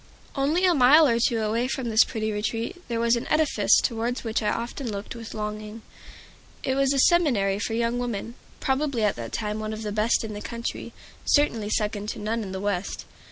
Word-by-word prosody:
Only 305 +7 +2
a 360 - +5
mile 295 +3 +7
or 235 -2 +2
two 230 -1 +1
away 230 +3 0
from 260 -2 -3
this 220 +1 +6
pretty 220 -2 -3
retreat 225 - -3
there 235 -1 -2
was 235 +1 +3
an 235 - -4
edifice 250 -10 +3
towards 235 +2 -1
which 225 0 -1
I 210 - +1
often 240 +1 -3
looked 200 +2 -6
with 230 -1 -8
longing. 210 +1 -5 0.8
It 265 - 0
was 275 0 +2
a 280 - +1
seminary 255 - +3
for 225 +1 -2
young 235 +1 0
women, 235 -2 -4 0.3
probably 265 -3 0
at 210 - +2
that 115 -1 -6
time 210 -1 -3
one 215 0 -4
of 215 +1 -6
the 210 - -3
best 215 +3 +1
in 220 -1 -5
the 205 - -6
country, 235 +1 -5 0.3
certainly 230 -8 +2
second 210 -1 -1
to - - -5
none 225 +2 -2
in 195 -3 -6
the 190 - -4
West. 200 -1 -3
230 Hz, 205 wpm, -25 LUFS, 210-250 Hz, 0.8 s, mile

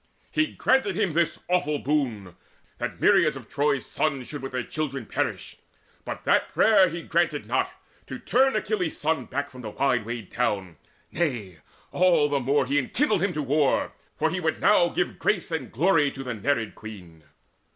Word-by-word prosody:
He 310 0 +2
granted 260 - +1
him 180 -3 0
This 170 0 0
awful 150 -5 +1
boon, 125 - -2 0.4
that - - -4
myriads - - +4
of - - -11
Troy's 145 -1 0
sons 140 -5 -2
Should 145 - -6
with 135 - -6
their 125 -1 -2
children 135 -5 -4
perish: - - -3 0.5
but - - -6
that - - +2
prayer 200 -4 +5
He 170 0 -6
granted 165 -3 0
not, - - 0 0.4
to - - -6
turn 265 0 +2
Achilles' 210 -6 -1
son 160 +2 0
Back 145 0 -4
from 130 -1 -10
the 110 - -6
wide 125 +1 +1
wayed 115 -3 -6
town; 100 -9 -1 0.3
nay, 120 - -2 0.3
all 175 -5 +4
the 145 -1 +1
more 135 +2 +1
He 140 +3 +2
enkindled 210 - 0
him 195 -1 0
to 150 - -2
war, 145 +1 +1 0.2
for 160 - 0
he 180 - -2
would 160 -2 -1
now 180 -4 +4
Give 180 - -2
grace 185 -4 0
and 160 - -3
glory 160 +1 +3
to 135 0 -8
the 125 -2 -4
Nereid 115 0 -1
Queen. 90 -8 -11
145 Hz, 180 wpm, -25 LUFS, 125-175 Hz, 0.5 s, prayer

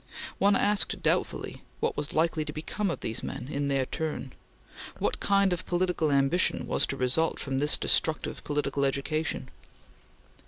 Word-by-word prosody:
One 200 0 +4
asked 205 -1 +2
doubtfully - - -1 0.2
what - - 0
was 145 0 -2
likely 160 0 +1
to 150 - -5
become 175 +7 -3
of 170 - -4
these 110 - -3
men 125 - -6
in 145 -1 -1
their 135 -1 +1
turn. 150 -3 -4 0.6
What - - -1
kind 200 -2 +3
of 175 - -5
political 175 -3 +1
ambition 140 +6 +2
was - - +1
to 135 - -3
result 130 +6 +1
from 135 -2 -2
this 150 +2 +4
destructive 160 -1 +1
political 145 -1 -1
education? 140 0 -1
155 Hz, 155 wpm, -28 LUFS, 140-175 Hz, 0.6 s, One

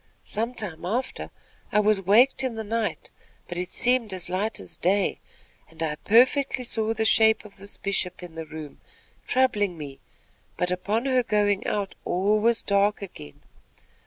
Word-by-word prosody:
Some 230 +4 -3
time 180 -9 -4
after, 240 +9 -3 0.4
I 210 - +3
was 210 -1 +3
waked 240 +8 +4
in 255 -3 -2
the 220 - -4
night; 225 +1 -3 0.4
but 175 - -6
it 180 0 -3
seemed 245 -2 +2
as 180 -2 -2
light 195 +5 -2
as 95 - -7
day, 195 +3 +1 0.5
and 165 0 -6
I 155 -2 -1
perfectly 255 - +3
saw 225 -2 -1
the 220 0 0
shape 220 0 +5
of 210 - -14
this 200 +1 -5
Bishop 185 -2 -1
in 175 -2 -9
the 160 -1 -7
room, 155 -1 -9 0.5
troubling 205 -9 +1
me; 140 -3 -8 0.6
but 180 0 0
upon 205 +6 -1
her 260 -2 +3
going 205 -3 +1
out, 200 -2 -2
all 200 +4 +1
was 230 +1 +2
dark 200 +1 +1
again. 75 - -11
205 Hz, 165 wpm, -25 LUFS, 180-225 Hz, 0.6 s, shape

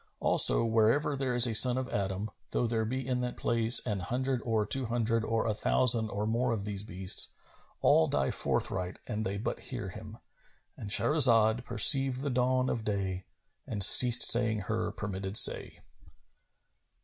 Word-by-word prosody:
Also, - - +4
wherever 115 +6 -1
there 130 -2 -5
is 120 0 +5
a 120 - -4
son 125 +3 +6
of 130 -1 -6
Adam, 100 +1 -6 0.2
though - - -4
there 115 -1 -4
be 130 +3 -7
in 125 -1 -4
that 125 0 -7
place 115 +1 +1
an 105 -5 -5
hundred 125 +6 -5
or 110 -3 -3
two 130 +3 0
hundred 115 -1 -3
or 115 0 -4
a 110 - -3
thousand 115 0 -1
or 105 +1 -6
more 120 +3 -3
of 105 -3 -6
these 100 -2 -6
beasts, 95 -3 +1 0.5
all 80 - +1
die 70 -1 -3
forthright 90 0 -4
an 110 -3 -7
they 100 -2 -6
but 105 - -7
hear 120 -7 -9
him,—And 105 0 -16
Shahrazad 115 -1 +2
perceived 130 +3 +4
the 140 -1 -5
dawn 130 +1 -2
of 115 - -5
day 95 -3 -6 0.4
and 100 -3 -1
ceased 120 +5 +7
saying 115 -3 +4
her 110 +2 -5
permitted 100 -1 -4
say. - - +3
115 Hz, 165 wpm, -27 LUFS, 105-125 Hz, 0.5 s, ceased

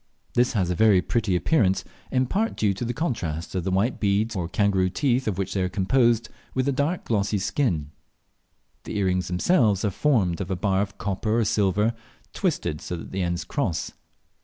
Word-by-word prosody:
This 125 +1 +2
has 95 -5 +1
a - - 0
very 105 -1 +5
pretty 105 0 0
appearance, 95 - +2 0.3
in 130 0 +2
part 215 - -1
due 105 -2 +2
to 100 - -5
the 120 - -1
contrast 100 - -3
of 90 -3 -1
the 95 - -1
white 100 +7 +1
beads 105 +2 +1
or 85 -3 -2
kangaroo 95 -1 +2
teeth 130 +3 0
of 100 -4 -1
which 95 -2 -2
they 95 - 0
are 90 - 0
composed 115 +4 +2 0.3
with 130 0 +1
the 140 - +2
dark 145 +6 -1
glossy 105 -2 0
skin. 95 - -1 0.9
The - - -4
earrings 95 -3 +1
themselves 105 - +2
are 105 - +1
formed 100 - +1
of 95 - -4
a 95 - 0
bar 95 +1 +1
of 100 0 -4
copper 105 +3 -1
or 115 - +2
silver, 105 +2 +2 0.4
twisted 75 - -1
so 90 - -4
that - - -9
the 95 - -2
ends 85 0 -1
cross. 100 - -2
100 Hz, 195 wpm, -25 LUFS, 95-120 Hz, 0.9 s, very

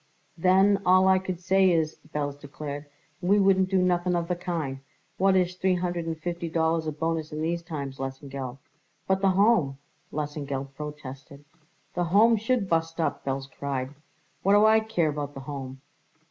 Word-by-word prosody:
"Then 190 +3 +4
all 185 +1 +5
I 190 0 +5
could 185 -2 -4
say 190 +1 +3
is," 160 -3 +1
Belz 145 -1 -3
declared, 145 0 -7 0.3
"we 190 +3 +3
wouldn't 190 -2 +4
do 190 - +2
nothing 180 -1 +2
of 170 -1 -1
the 180 - 0
kind. 165 -7 -3 0.4
What 190 0 +4
is 180 -1 +2
three 185 0 +1
=hundred 175 -2 -2
and 165 -1 -3
fifty 170 +1 -4
dollars 160 0 +1
a - - 0
bonus 160 +1 -2
in 150 - -5
these 170 +2 -1
times, 140 -6 -6
Lesengeld?" 135 -1 -5 0.5
"But 190 0 +1
the 195 - +4
Home," 185 -8 +3 0.3
Lesengeld 140 -2 -4
protested. 140 -1 -9 0.5
"The 175 0 0
Home 215 +7 +5
should 225 -1 0
bust 165 -1 0
up," 165 - -1
Belz 135 0 -3
cried. 135 -1 -4 0.5
"What 195 - +3
do 205 +1 +6
I 220 0 +6
care 200 -8 0
about 145 -1 -4
the 135 - -6
Home?" 135 -1 -7
165 Hz, 175 wpm, -27 LUFS, 145-185 Hz, 0.5 s, do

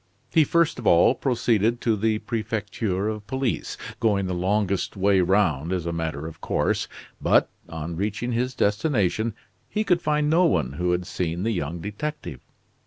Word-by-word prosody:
He 160 - +6
first 170 -3 +2
of 120 - -3
all 85 +8 +6
proceeded 120 -3 +1
to 115 -2 +2
the 110 +1 +1
Prefecture 105 -3 -2
of 105 -1 -4
Police, 130 0 -2 0.2
going 100 -4 +2
the 90 - -2
longest 95 +2 0
way 95 0 +3
round 85 -5 +2
as 90 -3 -1
a 85 - -1
matter 80 -3 -3
of 80 -1 -9
course, - - 0 0.3
but, - - +3 0.2
on 80 +1 -5
reaching 105 +6 -2
his 125 +2 -1
destination, 110 - +1 0.3
he 215 - 0
could 180 -4 +2
find 150 -1 +1
no 165 +4 +4
one 75 - +1
who 90 +5 -1
had 90 0 0
seen 90 -1 -3
the 115 - +1
young 85 -3 -3
detective. 105 - -5
105 Hz, 170 wpm, -24 LUFS, 90-120 Hz, 0.3 s, He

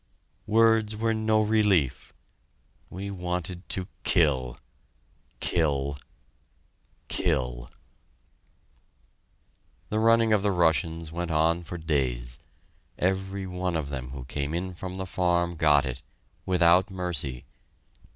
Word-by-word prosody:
Words 110 -1 +4
were 115 +1 0
no 110 0 +2
relief! 105 - +2 0.8
we 100 +2 -6
wanted 90 -1 -3
to 95 -1 -2 0.2
kill 65 -8 +2 0.8
kill 70 -4 0 1.1
kill. 60 -1 -1 2.2
The 110 - 0
running 115 0 +4
of 105 - +3
the 100 - +1
Russians 80 -2 +1
went 85 +1 -3
on 80 +2 +2
for 85 +1 -7
days. 65 -7 -2 0.6
Every 95 +1 -1
one 90 -1 -2
of 75 -3 -2
them 65 -3 -5
who 65 -1 -7
came 70 +4 -3
in 90 +2 -3
from 95 +1 -7
the 95 - -3
farm 85 -1 0
got 75 -3 +4
it 65 0 -5 0.5
without 90 0 +4
mercy.... 85 -9 -3
85 Hz, 110 wpm, -27 LUFS, 75-95 Hz, 2.2 s, Words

